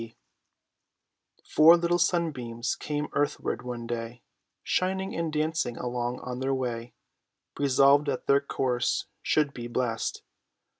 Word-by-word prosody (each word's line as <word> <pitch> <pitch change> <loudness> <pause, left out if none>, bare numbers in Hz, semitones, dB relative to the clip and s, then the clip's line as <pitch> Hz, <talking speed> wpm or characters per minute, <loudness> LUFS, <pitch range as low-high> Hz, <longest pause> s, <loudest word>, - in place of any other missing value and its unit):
K. 115 - -6
B. 115 - -24 1.3
Four 165 +3 +7
little 175 +1 +1
sunbeams 135 -10 0
came 150 0 -3
earthward 145 -3 -1
one 120 -1 -6
day, 115 0 -5 0.4
Shining 190 +1 -1
and 165 -1 -2
dancing 155 -5 -1
along 125 0 -3
on 125 0 -5
their 135 +1 0
way, 120 -2 -4 0.6
Resolved 140 +1 +4
that 135 -3 -2
their 140 0 +4
course 130 -3 -1 0.2
should 150 -2 +1
be 120 -1 -6
blest. 120 -1 -2
130 Hz, 130 wpm, -27 LUFS, 120-155 Hz, 1.3 s, Four